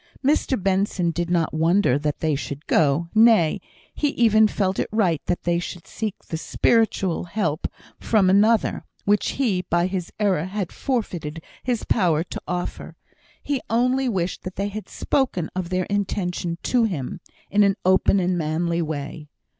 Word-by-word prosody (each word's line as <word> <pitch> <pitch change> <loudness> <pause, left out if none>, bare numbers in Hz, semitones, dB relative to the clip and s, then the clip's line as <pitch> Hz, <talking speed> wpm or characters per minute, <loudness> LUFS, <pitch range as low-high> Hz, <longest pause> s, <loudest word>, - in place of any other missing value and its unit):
Mr 280 -3 +2
Benson 190 -2 +1
did 170 +1 -2
not 170 -2 +1
wonder 160 -3 +3
that 150 0 -2
they 155 -1 +1
should 140 +1 -5
go; 155 +2 +2
nay, 220 -8 +5 0.3
he 295 - 0
even 220 -2 +5
felt 190 -2 -1
it - - -1
right 185 -8 +1
that 175 - -1
they 170 0 +1
should 175 -1 -7
seek 215 -3 -4
that 160 - -4
spiritual 195 -4 +1
help 170 -4 -1 0.3
from 210 -4 +2
another, 210 +4 +3 0.2
which 205 +1 +2
he, 220 -10 0
by 175 -1 +1
his 185 -2 -3
error, 190 -6 +1
had 190 -1 -4
forfeited 175 - -3 0.2
his 245 -3 -1
power 170 -7 +2
to 180 - -7
offer; 180 0 -4 0.5
he 280 -3 -1
only 250 +3 +2
wished 185 -5 -2
they 200 +1 -2
had 215 +1 -7
spoken 240 - -1
of 185 -2 -3
their 185 0 0
intention 180 -4 -2
to 245 -2 +2
him 155 - -4 0.3
in 205 - +4
an 200 -1 +4
open 190 +1 +4
and 180 -1 0
manly 170 +2 0
way. 150 -1 -5
185 Hz, 160 wpm, -23 LUFS, 170-215 Hz, 0.5 s, nay